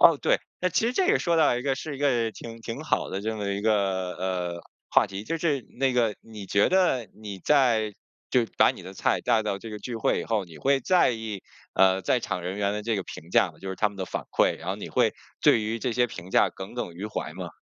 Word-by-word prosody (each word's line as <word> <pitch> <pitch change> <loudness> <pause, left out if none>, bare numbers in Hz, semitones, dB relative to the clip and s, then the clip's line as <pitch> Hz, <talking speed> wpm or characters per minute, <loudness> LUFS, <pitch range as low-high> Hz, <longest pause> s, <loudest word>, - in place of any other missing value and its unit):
哦， 165 -3 +8
对。 - - +2 0.2
那 180 - +2
其 200 +6 +1
实 245 - +1
这 370 +6 +2
也 430 - +4
说 170 -1 +1
到 155 -6 +4
一 125 - -3
个 135 -1 +1
是 145 0 -6
一 - - -11
个 120 -6 +2
挺 115 0 -9
挺 115 0 -6
好 - - 0
的 95 - -3
这 110 +2 -2
么 100 -1 -3
一 100 0 -1
个， 95 -4 +1
呃， 90 -2 -2 0.3
话 - - +5
题。 100 +2 -7
就 165 - -2
是 150 -6 0 0.2
那 135 -1 +2
个， 115 -4 +2
你 105 -3 -10
觉 100 +2 +3
得 175 - +2
你 105 -2 -8
在 115 - +3 0.4
就 125 -2 +3
把 - - +6
你 - - -9
的 95 +2 -9
菜 - - +1
带 115 -3 +2
到 100 -2 -2
这 110 +3 -9
个 105 - -6
聚 115 +3 -5
会 - - +1
以 - - -5
后， 110 -4 0
你 80 -3 -13
会 135 0 +2
在 180 -1 +4
意， 110 -4 -5 0.3
呃， 95 0 +4
在 125 - +2
场 90 -5 -3
人 90 +3 -4
员 100 0 0
的 105 - -3
这 110 0 0
个 95 - -2
评 85 0 -10
价 90 - +4
吗？ 75 - -21
就 95 - -7
是 95 - -4
他 105 - +2
们 100 - -14
的 95 - -3
反 - - -4
馈， - - +3
然 - - -8
后 - - -1
你 - - -7
会 - - +2 0.3
对 115 - +5
于 110 +2 -2
这 120 +1 -1
些 125 +1 +3
评 95 -6 -9
价 - - +4
耿 95 +5 -9
耿 105 -8 -4
于 95 +5 -5
怀 90 -6 -4
吗？ 90 -1 -5
110 Hz, 285 characters per minute, -26 LUFS, 95-125 Hz, 0.4 s, 哦